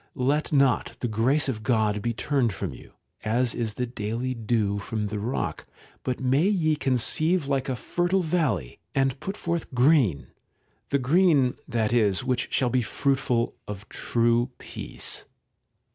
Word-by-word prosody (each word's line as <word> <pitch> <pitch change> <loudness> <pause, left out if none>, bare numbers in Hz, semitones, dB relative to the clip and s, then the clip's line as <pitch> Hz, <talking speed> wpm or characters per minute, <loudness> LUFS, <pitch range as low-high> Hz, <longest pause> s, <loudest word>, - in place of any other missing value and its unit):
Let 140 +3 0
not 140 -3 +2
the 120 - 0
grace 120 +7 +2
of 115 -5 -2
God 110 -3 +1
be 120 - 0
turned 120 -1 0
from 95 -6 -4
you, - - -14 0.3
as 120 +3 +1
is 110 -3 -2
the 125 - -1
daily 120 +2 -3
dew 110 -3 0
from 105 0 -3
the 105 0 -3
rock, 115 +5 -3 0.3
but 130 -1 -2
may 135 +7 +2
ye 165 -7 +2
conceive 150 +5 +1
like 135 -1 0
a 130 - 0
fertile 175 +7 0
valley, 155 - -1 0.2
and 135 0 +1
put 195 +2 -5
forth 170 -1 -3
green, 125 - +3 0.6
the 140 - +2
green, 140 -1 +3
that 115 -2 0
is, 105 -5 +2
which 125 -2 -1
shall 125 -2 +1
be 130 - +2
fruitful 130 -1 0
of 105 0 -7
true 120 +1 +1
peace. - - -4
125 Hz, 155 wpm, -26 LUFS, 110-140 Hz, 0.6 s, green